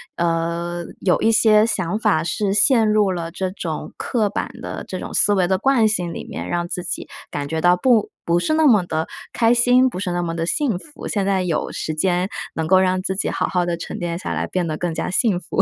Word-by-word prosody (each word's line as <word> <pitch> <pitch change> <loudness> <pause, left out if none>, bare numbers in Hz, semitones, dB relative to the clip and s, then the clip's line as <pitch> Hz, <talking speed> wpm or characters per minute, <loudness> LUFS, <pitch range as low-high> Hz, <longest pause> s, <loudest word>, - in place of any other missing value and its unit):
呃， 170 +1 -1 0.2
有 180 - +2
一 225 - +4
些 215 -1 +5
想 190 -4 -1
法 210 -9 +2
是 195 +4 -1
陷 220 +2 +4
入 210 -2 +3
了 170 -2 -3
这 190 +2 -3
种 165 -5 -5
刻 220 -4 0
板 - - -3
的 - - -6
这 - - -5
种 - - -7
思 205 - +4
维 185 -3 +2
的 190 +1 +2
惯 250 0 +3
性 180 -6 -1
里 - - -7
面， - - -6
让 175 0 -1
自 180 +1 -4
己 175 - -4 0.2
感 145 -1 -4
觉 160 +2 -2
到 175 +1 +4
不 225 +1 +3 0.2
不 170 +1 +2
是 310 - 0
那 315 0 +3
么 215 -8 +5
地 160 -1 -2 0.2
开 230 0 +3
心， 245 +2 +4
不 185 - -6
是 190 -2 -2
那 175 0 -1
么 165 -1 -3
地 165 0 -1
幸 245 - 0
福， 295 +7 -10
现 200 -2 -1
在 195 -1 +1
有 170 -3 -2
时 155 - -4
间 180 +3 +1 0.3
能 160 - -1
够 185 +2 +5
让 185 0 +1
自 190 +1 -2
己 195 - -1
好 - - -1
好 180 -1 0
地 175 -1 -2
沉 170 - -6
淀 170 -2 -3
下 - - -4
来， - - -2
变 180 -2 -1
得 155 - -2
更 175 0 -2
加 - - -3
幸 195 0 +2
福。 190 - -1
185 Hz, 260 characters per minute, -21 LUFS, 170-215 Hz, 0.3 s, 些